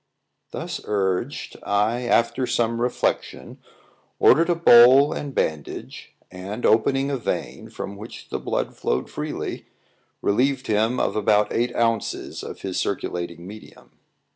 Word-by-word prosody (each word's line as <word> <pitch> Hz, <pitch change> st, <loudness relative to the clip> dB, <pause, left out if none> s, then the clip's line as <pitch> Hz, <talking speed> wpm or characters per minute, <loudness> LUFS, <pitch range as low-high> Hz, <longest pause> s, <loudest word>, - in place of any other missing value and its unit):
Thus -, -, -5 dB
urged, 100 Hz, +5 st, -2 dB
I, 110 Hz, +5 st, 0 dB
after 120 Hz, +2 st, +2 dB
some 115 Hz, -1 st, 0 dB
reflection, 125 Hz, 0 st, -2 dB, 0.6 s
ordered 165 Hz, +2 st, +5 dB
a 175 Hz, -, +3 dB
bowl 135 Hz, -2 st, +7 dB
and 145 Hz, -, -5 dB
bandage, 75 Hz, -2 st, -4 dB, 0.2 s
and 95 Hz, +5 st, -6 dB
opening 135 Hz, +5 st, +2 dB
a 140 Hz, -, -1 dB
vein, 120 Hz, -, -4 dB
from 100 Hz, -, -7 dB
which 110 Hz, +3 st, -10 dB
the -, -, -3 dB
blood -, -, -3 dB
flowed 65 Hz, -, -2 dB
freely, -, -, -5 dB, 0.6 s
relieved 130 Hz, +5 st, +1 dB
him 110 Hz, +3 st, +1 dB
of -, -, 0 dB
about 105 Hz, 0 st, +2 dB
eight 120 Hz, +1 st, 0 dB
ounces 115 Hz, -2 st, -1 dB
of -, -, -8 dB
his 95 Hz, -2 st, -3 dB
circulating 85 Hz, -3 st, -3 dB
medium. 105 Hz, +3 st, -13 dB
115 Hz, 130 wpm, -23 LUFS, 100-125 Hz, 0.6 s, bowl